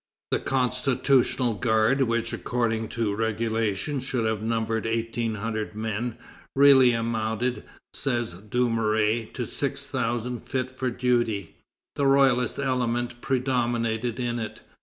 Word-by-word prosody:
The - - +2
Constitutional 130 -1 +1
Guard, 110 +5 +2
which 115 -2 0
according 115 -2 -1
to 115 -3 -1
regulation 110 +3 -1
should 125 -3 -2
have 110 -1 0
numbered 115 0 -1
eighteen 115 0 -1
hundred 110 0 -3
men, 110 +2 -3 0.4
really 135 -2 +7
amounted, 115 +1 -1 0.3
says 120 -8 0
Dumouriez, 110 +1 0
to - - -3
six - - -2
thousand 120 +1 -2
fit 130 -2 -1
for 130 0 -2
duty. 120 -4 0 0.4
The 140 - +2
royalist 135 -3 +3
element 120 -3 -1
predominated 120 -3 0
in 120 -1 -1
it. 110 -2 -6
115 Hz, 115 wpm, -26 LUFS, 110-125 Hz, 0.4 s, really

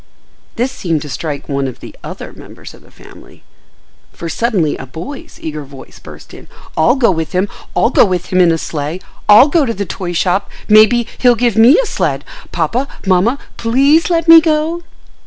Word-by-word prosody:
This 250 +3 -1
seemed 170 - -3
to 150 - -9
strike 145 0 -5
one 140 -1 -2
of 130 - -8
the - - -12
other - - -8
members - - -13
of - - -17
the - - -21
family, - - -17 0.7
for 170 - -7
suddenly 190 -5 0
a 135 - -9
boy's 280 - -9
eager 155 -1 -6
voice 135 -1 -14
burst - - -14
in: - - -13 0.3
"I'll 160 +10 +3
go 245 -7 +2
with 160 +1 -4
him. 185 +2 0 0.3
I'll 235 - +2
go - - +5
with 185 -4 -2
him 185 - +4
in 175 -2 +4
a 165 - 0
sleigh. 155 +2 -5 0.3
I'll 215 +7 +8
go 310 +1 +2
to 230 -4 -2
the 200 +1 -3
toy 175 0 -5
shop. 185 +3 0 0.2
Maybe, 220 +2 +5
he'll 245 -1 +4
give 235 0 0
me 230 +7 +6
a - - +1
sled. 155 - -2 0.3
Papa, 205 - -1 0.2
mamma, 195 +7 +2 0.2
please 275 +9 +2
let 335 -1 0
me 330 0 +9
go." 320 +1 -1
200 Hz, 195 wpm, -15 LUFS, 165-260 Hz, 0.7 s, me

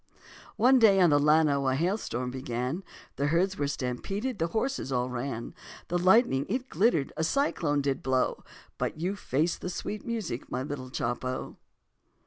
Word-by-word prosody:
One 255 +2 +5
day 205 -4 +6
on 175 -4 +5
the 145 - +5
Llano 150 -2 +3
a 130 - +2
hailstorm 150 - -1
began, 130 +6 -3 0.3
The 140 - +1
herds 185 +5 +1
were 145 - +1
stampeded, 195 - -3
the 165 - +1
horses 220 - -2
all 125 0 0
ran, 120 -1 -4 0.4
The 175 +1 +1
lightning 185 - +4
it 255 +4 -2
glittered, 165 - +2
a 160 - 0
cyclone 160 - +1
did 135 -1 -1
blow, 130 -1 0 0.4
But - - -2
you 185 +5 -1
faced 165 -3 -1
the - - -3
sweet 205 +4 -5
music, 215 - -4
my 130 - -2
little 135 -3 -6
Chopo. 125 +1 -3
150 Hz, 160 wpm, -28 LUFS, 130-195 Hz, 0.4 s, day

